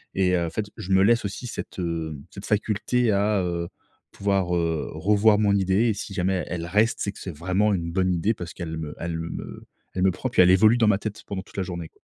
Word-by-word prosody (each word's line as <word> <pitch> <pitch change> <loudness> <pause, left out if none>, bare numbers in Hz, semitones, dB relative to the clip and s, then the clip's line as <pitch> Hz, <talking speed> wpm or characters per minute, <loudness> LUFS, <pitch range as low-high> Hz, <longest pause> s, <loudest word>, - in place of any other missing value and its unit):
Et 90 -1 +3
heu, 85 -1 +1
en - - -3
fait, 105 +5 -3
je 95 - -6
me 95 0 +5
laisse 115 +2 +4
aussi 100 +5 -5
cette, 115 - -7
heu, 80 -3 -3
cette - - -9
faculté 110 +3 +1
à, 100 0 +2
heu, 85 -1 -2 0.4
pouvoir, 95 -3 0
heu, 80 -2 -1
revoir 105 +5 +3
mon 100 -1 +3
idée. 95 +3 +2
Et 110 - +2
si 105 0 -6
jamais 95 0 0
elle 85 -1 -3
reste, 105 +6 +2
c'est 100 - -1
que - - -13
c'est 90 - -6
vraiment 95 +5 +1
une 85 -3 -2
bonne 95 0 +1
idée 90 +6 +1
parce 90 -5 -7
qu'elle 80 -3 -5
me 80 -2 -6
elle 85 -1 -3
me 80 0 -6 0.3
elle 90 - -1
me 95 - +5
prend, 130 - -4
puis 115 - +4
elle 90 - +6
évolue 110 +5 +6
dans 115 -3 +3
ma 105 - +4
tête 110 -1 -6
pendant 95 -2 -4
toute - - -20
la 95 - 0
journée, 85 -3 -5
quoi. - - -32
95 Hz, 245 wpm, -25 LUFS, 85-105 Hz, 0.4 s, elle